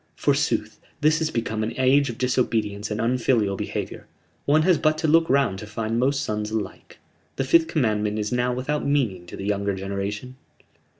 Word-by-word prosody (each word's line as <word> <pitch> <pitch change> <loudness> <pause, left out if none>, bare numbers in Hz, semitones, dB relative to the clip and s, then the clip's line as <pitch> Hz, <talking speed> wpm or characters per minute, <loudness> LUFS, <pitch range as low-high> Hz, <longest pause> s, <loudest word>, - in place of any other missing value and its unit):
Forsooth, - - 0 0.2
this 155 +1 +4
has 160 -1 0
become 115 -4 -2
an 110 +4 -3
age 135 +1 +4
of 115 - -6
disobedience 110 -5 0
and 105 0 -3
unfilial 115 -3 +1
behavior; - - -5 0.4
one 155 +2 +4
has 180 -1 +4
but 155 0 +2
to 160 0 0
look 165 +2 +4
round 135 -9 +2
to 105 - -8
find 110 +2 -2
most 140 +3 +1
sons 105 -4 -2
alike. 110 -3 -5 0.4
The - - -1
Fifth 160 +4 +4
Commandment 110 -9 0
is 105 -1 -2
now 125 0 +1
without 135 +4 -2
meaning 120 -12 0
to - - -9
the 95 - -6
younger 100 -1 0
generation." 100 +6 -4
120 Hz, 180 wpm, -24 LUFS, 105-140 Hz, 0.4 s, this